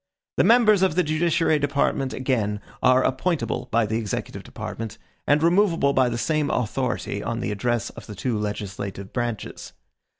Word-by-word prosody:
The - - +5
members 220 -4 +5
of 190 -5 +2
the 180 - +3
judiciary 155 0 +2
department, 140 -1 0
again, 115 -6 -1 0.2
are 130 0 +5
appointable 130 -1 -1
by 115 0 +2
the 110 +2 -1
executive 105 -3 -4
department, 115 -2 -7 0.3
and 145 +2 +3
removable 170 -5 +3
by 130 -2 +3
the 120 - -2
same 150 +5 0
authority 120 -4 -2
on 115 - -3
the 120 - -2
address 120 +2 -1
of - - -12
the 105 - -8
two 120 +4 -2
legislative 100 -2 -5
branches. 120 -3 -4
130 Hz, 160 wpm, -24 LUFS, 110-155 Hz, 0.3 s, The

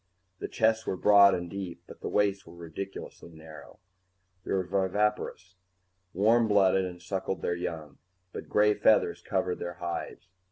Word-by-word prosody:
The - - -4
chests 110 0 +1
were 95 - -1
broad 100 0 +6
and 90 0 -4
deep, 95 -1 -7
but - - -14
the - - -4
waists 100 -1 0
were 85 - -13
ridiculously 85 +2 -8
narrow. 80 -1 -13 0.7
They - - -6
were 95 -1 +1
viviparous, 95 0 -1 0.6
warm 110 +5 +3
blooded, 95 -2 +3
and 90 -1 -7
suckled 95 +1 -4
their 85 - 0
young, 80 -3 -6 0.3
but - - -8
gray 105 0 +4
feathers - - +2
covered 90 -1 -2
their 85 - -5
hides. 85 0 -6
95 Hz, 155 wpm, -28 LUFS, 85-105 Hz, 0.7 s, broad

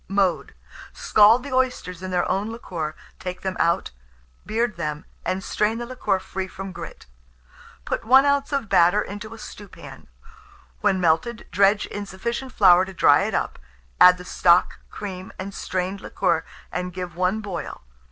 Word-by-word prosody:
Mode. 195 -3 0 0.4
Scald 220 +4 +5
the 280 -2 -6
oysters 250 -9 -1
in 185 - -5
their 180 -1 0
own 200 +3 -1
liquor, 165 -9 -5 0.2
take 180 0 -6
them 190 -1 -3
out, 170 +1 +1 0.6
beard 225 -1 0
them, 150 -2 -4 0.2
and 190 +1 -2
strain 215 +4 0
the 240 - -4
liquor 250 -5 -1
free 190 0 -5
from 195 0 -8
grit. - - -9 0.8
Put - - -2
1 260 +4 +6
oz. 280 0 +1
of 275 -6 -1
batter 180 +3 +4
into 210 +3 -8
a - - -13
stewpan; 210 -1 -11 0.7
when 195 -2 +2
melted, 175 +7 +1
dredge 200 +1 +3
in 205 0 -6
sufficient 235 +7 -4
flour 185 -6 +6
to 190 - -10
dry - - +5
it - - -2
up; - - -2 0.4
add 180 0 +8
the 180 - -10
stock, 175 0 +3
cream, 190 -2 -7
and 195 +1 -6
strained 190 +1 -3
liquor, - - 0 0.3
and 180 0 -4
give 180 -2 -6
one 185 +4 0
boil. 195 - -6
195 Hz, 160 wpm, -23 LUFS, 180-220 Hz, 0.8 s, add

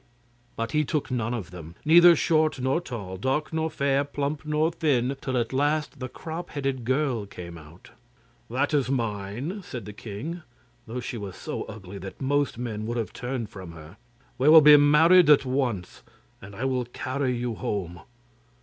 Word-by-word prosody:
But 115 0 -3
he 150 0 +2
took 150 -2 -2
none 115 -2 -1
of 95 -6 -6
them, 85 -2 -10
neither 170 +2 +8
short 155 -2 +2
nor 130 +6 +1
tall, 105 - -6
dark 135 - -1
nor 160 0 0
fair, 140 -1 +1
plump 145 +1 -3
nor 155 +2 +1
thin, 140 -6 +1
till 130 -1 -2
at 115 -2 0
the - - -6
last 145 +1 0
the 130 -1 -5
crop 165 +5 -7
headed 135 -4 -3
girl 130 -5 0
came 85 -3 -9
out. 80 +5 -14 0.6
'This 140 +5 0
is 140 -4 +2
mine,' 115 - -3
said 125 -9 -7
the 105 - -8
king, 120 - -6 0.5
though 120 +3 -4
she 120 - -5
was 100 -3 -7
so - - -5
ugly 100 -2 -9
that 95 0 -9
most 140 -1 0
men 110 -3 -4
would 120 +1 -2
have 115 - -3
turned 125 -3 -4
from 95 -6 -9
her. 80 +4 -13 0.4
'We 135 +4 +4
will 160 0 +10
be 150 0 +9
married 150 +4 +6
at 145 -2 +6
once, 125 -8 -2 0.4
and 100 +1 -11
I 125 - -3
will 130 -2 0
carry 130 +1 -2
you 120 -1 -2
home. 90 -5 -4
130 Hz, 185 wpm, -26 LUFS, 105-150 Hz, 0.6 s, will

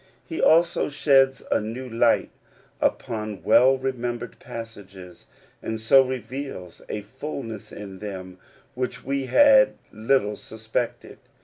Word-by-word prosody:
He 325 - -4
also 170 0 +4
sheds 135 -2 +3
a - - +2
new 115 +5 -6
light 115 0 +2 0.5
upon 105 -3 -2
well 130 +2 +5
remembered 125 -2 -4
passages, 100 -6 -10 0.3
and 110 0 -4
so 110 +5 +6
reveals 130 -7 -6
a 105 - -3
fullness 125 -2 -7
in 100 -2 -9
them 95 -3 -8 0.3
which 125 -1 -4
we 135 0 -2
had 275 - +6 0.2
little 110 -1 0
suspected. 110 +2 -5
120 Hz, 115 wpm, -24 LUFS, 105-135 Hz, 0.5 s, so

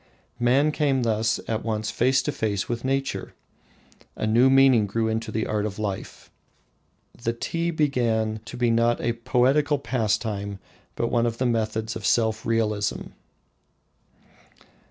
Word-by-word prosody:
Man 130 +5 +3
came 140 -4 +1
thus 110 -1 +1
at 110 -1 -2
once 110 -1 -2
face 130 +3 +2
to 150 - -1
face 105 -7 -2
with 120 -1 -3
nature. 135 +1 -2 0.8
A - - -3
new 120 +4 +4
meaning 135 -5 +5
grew 110 +3 -1
into 110 0 -2
the 110 - -1
art 105 -1 -1
of 105 -2 -4
life. 105 -3 -5 0.8
The 115 0 -2
tea 165 +8 -2
began 120 -8 0
to 125 - -8
be 120 -1 +2
not 115 +1 +2
a 120 - 0
poetical 135 +5 +2
pastime, 105 -6 -2 0.4
but 115 - -1
one 120 -1 +2
of 115 0 -3
the 130 - -1
methods 110 -1 -1
of - - -6
self 110 +2 +1
realisation. 105 -3 -1
115 Hz, 145 wpm, -25 LUFS, 110-130 Hz, 0.8 s, meaning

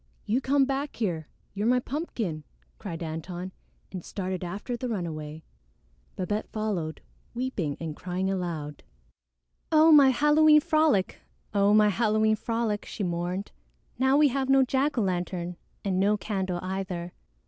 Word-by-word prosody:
"You 235 +5 +1
come 275 +1 +3
back 275 +2 -3
here; 170 -9 -2 0.3
you're 205 +2 -1
my 250 +1 +4
pumpkin," 235 - -4 0.4
cried 170 -5 -6
Antone 175 +3 -5 0.4
and 185 -3 -6
started 185 -2 -4
after 200 +8 -4
the 245 +1 -4
runaway. 160 -6 -4 0.7
Babette 205 +4 -2
followed, 190 -8 -3 0.3
weeping 225 - -2
and 160 -2 -5
crying 180 +2 -3
aloud. 170 -6 -3 0.9
"Oh, 315 +1 +6
my 285 -3 +8
Halloween 300 +4 +5
frolic! 310 -11 +2 0.3
Oh, 200 0 +4
my 210 -1 +6
Halloween 215 0 +2
frolic!" 225 -1 -2
she 205 - -5
mourned. 175 +2 -2 0.5
"Now 265 +2 +4
we 295 -1 +5
have 265 +1 -1
no 270 0 +6
jack 270 +2 0
o' - - +3
lantern 180 -2 -2 0.3
and 185 -2 +1
no 205 +2 +3
candle 190 -4 -2
either." 185 -2 -4
200 Hz, 140 wpm, -27 LUFS, 175-255 Hz, 0.9 s, my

